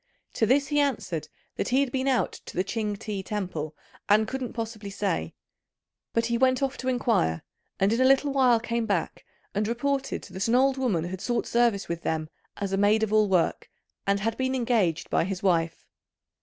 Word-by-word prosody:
To 225 - +1
this 275 +4 +3
he 295 -1 +2
answered 215 - -1 0.3
that - - -1
he 260 +2 +3
had 275 -3 -1
been 265 +1 -1
out 260 -2 +2 0.2
to - - -8
the 185 - +3
Ch'ing 210 +1 -2
ti 200 -1 -4
temple 180 -7 -4 0.3
and 215 +1 +5
couldn't 260 0 -4
possibly 225 -3 -5
say; 195 - -2 0.8
but 230 0 +1
he 235 0 0
went 260 +1 +3
off 270 0 0
to 260 - -5
inquire, 225 - +1 0.4
and 195 +3 +3
in 235 - +1
a - - +5
little 270 +1 +4
while 255 -4 +4
came 235 0 -2
back - - -1 0.3
and 210 +1 0
reported 270 +4 -1
that 190 +2 -3
an 230 - +3
old 265 +1 +4
woman 225 -11 0
had 180 +2 -5
sought 240 -1 -1
service 235 -4 +2
with 170 0 -3
them 155 -1 -2 0.3
as 200 -1 -3
a - - +2
maid 210 +2 +3
of 215 -1 -1
all 215 -1 +4
work, 180 -3 +1 0.4
and 200 0 +2
had 225 +2 0
been 260 0 0
engaged 225 -10 +1
by - - +3
his 190 +1 -4
wife. 165 -3 +1
220 Hz, 200 wpm, -27 LUFS, 195-255 Hz, 0.8 s, and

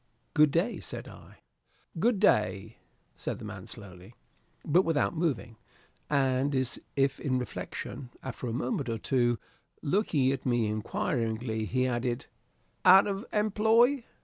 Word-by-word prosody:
"Good 150 0 +6
day," 170 +11 0
said - - -7
I. - - -14 0.6
"Good 225 +1 +2
day," 105 - +2 0.4
said - - -4
the - - -9
man - - -8
slowly, 95 +2 -11 0.5
but 175 +5 +4
without 165 0 +1
moving, 135 -9 -1 0.5
and 135 0 +2
as 130 -1 -1 0.2
if 135 -1 +1
in 130 -3 0
reflection. 125 +1 -6
After 130 -1 -5
a - - -2
moment 125 +2 -2
or 115 - -1
two, 120 0 +1 0.5
looking 145 -6 +2
at 135 -2 -3
me 120 -3 +1
inquiringly, 110 - -2
he 130 +4 0
added, 120 -1 -1 0.6
"Out 190 +1 +8
of 200 +1 -3
employ?" 220 +5 +3
130 Hz, 135 wpm, -29 LUFS, 120-175 Hz, 0.6 s, Out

